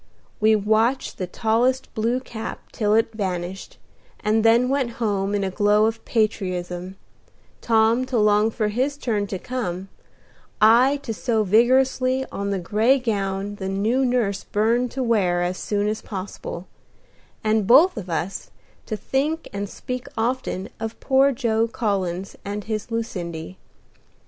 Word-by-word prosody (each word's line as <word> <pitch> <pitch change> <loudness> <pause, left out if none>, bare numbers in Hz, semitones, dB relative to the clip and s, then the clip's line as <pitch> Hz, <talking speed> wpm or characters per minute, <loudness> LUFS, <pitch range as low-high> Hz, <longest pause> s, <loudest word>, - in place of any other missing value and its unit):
We 220 0 +5
watched 220 +5 +1
the 185 - -2
tallest 240 +7 0
blue 230 +3 0
cap 225 -3 -7
till 210 -1 +1
it 225 0 +2
vanished, 190 -2 -4 0.4
and 215 +1 +2
then 230 +2 +5
went 260 -3 0
home 205 -3 0
in 200 - 0
a 190 - -1
glow 210 +2 +3
of 225 +1 -2
patriotism, 185 -4 -2 0.7
Tom 225 +2 +3
to 255 - -1
long 210 0 +4
for 215 -1 -1
his 260 +6 -1
turn 215 -7 -1
to 195 -2 -4
come, 195 -5 -4 0.7
I 240 +6 +5
to 230 - -3
sew 225 -1 0
vigorously 255 +4 +3
on 200 0 -3
the 200 - 0
gray 215 +9 +2
gown 200 -4 -2
the 190 -1 -4
new 215 +7 +1
nurse 240 -6 0
burned 230 +4 +1
to 265 - -1
wear 185 -7 +2
as 180 +1 -2
soon 205 0 -1
as 215 +1 -2
possible, 190 -3 -6 0.8
and 215 -2 +1
both 305 +10 +6
of 195 -5 -6
us 170 +3 -3 0.4
to 215 - -3
think 295 +8 -1
and 200 0 -3
speak 250 +2 -6
often 225 -4 -2
of 225 0 -5
poor 270 +1 +4
Joe 230 -3 +1
Collins 195 -5 -2
and 205 +1 -4
his 215 +2 -4
Lucindy. 180 -7 -5
220 Hz, 150 wpm, -23 LUFS, 195-240 Hz, 0.8 s, both